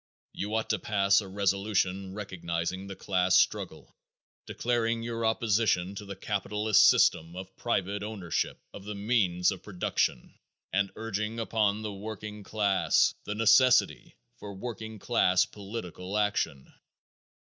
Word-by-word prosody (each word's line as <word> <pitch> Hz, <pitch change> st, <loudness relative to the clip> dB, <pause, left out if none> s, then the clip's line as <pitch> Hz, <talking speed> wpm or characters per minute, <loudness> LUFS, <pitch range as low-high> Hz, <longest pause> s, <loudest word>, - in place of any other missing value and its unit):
You 105 Hz, +2 st, -3 dB
ought 110 Hz, 0 st, -1 dB
to 105 Hz, -, 0 dB
pass 100 Hz, +1 st, +3 dB
a 100 Hz, -, -8 dB
resolution 95 Hz, -1 st, -1 dB
recognizing 95 Hz, -2 st, -4 dB
the 100 Hz, -, -7 dB
class 90 Hz, -2 st, +1 dB
struggle, -, -, -1 dB, 0.5 s
declaring 115 Hz, -1 st, -1 dB
your 115 Hz, 0 st, -3 dB
opposition 110 Hz, -4 st, +1 dB
to 105 Hz, +1 st, -8 dB
the 100 Hz, 0 st, -7 dB
capitalist 105 Hz, +1 st, +2 dB
system 80 Hz, +2 st, +3 dB
of 95 Hz, +1 st, -9 dB
private 100 Hz, -3 st, -1 dB
ownership 100 Hz, -6 st, -3 dB, 0.2 s
of 100 Hz, -, -9 dB
the 105 Hz, +1 st, -6 dB
means 100 Hz, -5 st, +1 dB
of 95 Hz, -, -7 dB
production, 90 Hz, -, -2 dB, 0.4 s
and 100 Hz, 0 st, +1 dB
urging 110 Hz, +1 st, -3 dB
upon 110 Hz, -2 st, 0 dB
the 105 Hz, -1 st, -4 dB
working 105 Hz, +1 st, -7 dB
class 100 Hz, -1 st, +2 dB
the 105 Hz, -, -3 dB
necessity 115 Hz, +3 st, +4 dB, 0.2 s
for 100 Hz, -1 st, -8 dB
working 110 Hz, +1 st, -6 dB
class 95 Hz, -4 st, +2 dB
political 100 Hz, -2 st, -6 dB
action. 105 Hz, -10 st, -1 dB
100 Hz, 130 wpm, -29 LUFS, 95-110 Hz, 0.5 s, necessity